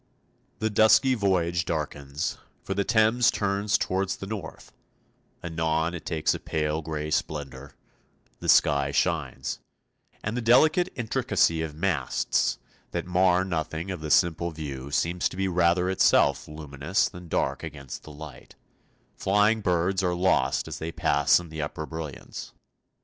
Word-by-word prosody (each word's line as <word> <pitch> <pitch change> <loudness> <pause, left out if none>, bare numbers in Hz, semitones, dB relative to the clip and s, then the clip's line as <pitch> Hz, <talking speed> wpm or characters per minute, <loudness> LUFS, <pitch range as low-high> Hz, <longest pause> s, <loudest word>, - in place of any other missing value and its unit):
The 110 0 -1
dusky 110 +5 +5
voyage 90 -6 +1
darkens, 75 -3 -3 0.2
for - - -3
the 100 - 0
Thames 115 +3 +3
turns 100 +1 +1
towards 95 0 -1
the - - -8
north; 100 -5 -7 0.7
anon 80 0 -1
it 90 - -7
takes 80 -2 +1
a - - -5
pale 75 0 -2
grey 75 -1 -4
splendour, 70 -3 -3 0.6
the - - -4
sky 70 -1 +4
shines, 70 -3 -1 0.6
and 105 - -2
the 125 - -1
delicate 155 +10 +4
intricacy 95 -8 +1
of 80 -2 -4
masts 80 -6 0 0.3
that - - -3
mar 90 0 +3
nothing 80 0 -3
of 90 - -5
the 75 - -5
simple 85 +1 +3
view 70 -4 -6
seems 85 +4 0
to - - -10
be 95 0 0
rather 90 0 +2
itself 95 0 +3
luminous 75 +3 -1
than 90 0 -11
dark - - -1
against 70 -3 -8
the 75 - -12
light; 75 -2 -11 0.6
flying 105 +3 +2
birds 90 0 +1
are 90 -2 0
lost 85 -7 +1
as - - -6
they 80 +1 -4
pass 75 -1 +3
in 85 -2 -10
the 80 0 -5
upper 75 +1 -4
brilliance. 80 -3 -7
85 Hz, 145 wpm, -26 LUFS, 75-95 Hz, 0.7 s, dusky